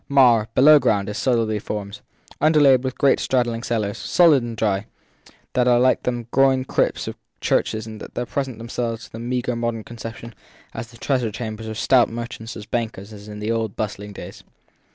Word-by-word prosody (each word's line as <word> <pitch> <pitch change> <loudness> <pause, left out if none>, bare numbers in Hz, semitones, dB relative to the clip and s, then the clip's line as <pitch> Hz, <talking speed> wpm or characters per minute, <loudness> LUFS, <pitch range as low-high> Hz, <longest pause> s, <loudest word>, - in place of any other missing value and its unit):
Marr, 120 -6 +5
below 150 +3 +8
ground, 100 -6 +1
is 105 - -4
solidly 115 -4 +1
founded 100 -1 -5 0.4
underlaid 145 -4 +5
with 130 -1 -3
great 140 - +3
straddling 120 -3 0
cellars, 110 -4 -2
sound 170 -3 +5
and 120 -4 -1
dry, 105 -2 0 0.7
that 125 -1 +2
are 120 -1 +5
like 130 +1 +3
the 120 -2 -2
groined 135 -1 +3
crypts - - 0
of - - -5 0.2
churches 110 0 0
and 110 -1 -9
that 125 - -5
present 135 -4 -3
themselves 115 0 -4
to - - -17
the 115 - -8
meagre 125 0 -2
modern 115 -1 -2
conception 115 0 -9 0.4
as 115 +1 -6
the 115 0 -16
treasure 125 -3 0
chambers 110 0 -6
of 110 -1 -5
stout 125 +1 +4
merchants 115 0 -6
and 110 0 -10
bankers 110 -3 -3
in 105 0 -8
the 105 +2 -2
old 110 -3 -2
bustling 105 -1 -4
days. 100 - -10
115 Hz, 180 wpm, -22 LUFS, 110-125 Hz, 0.7 s, below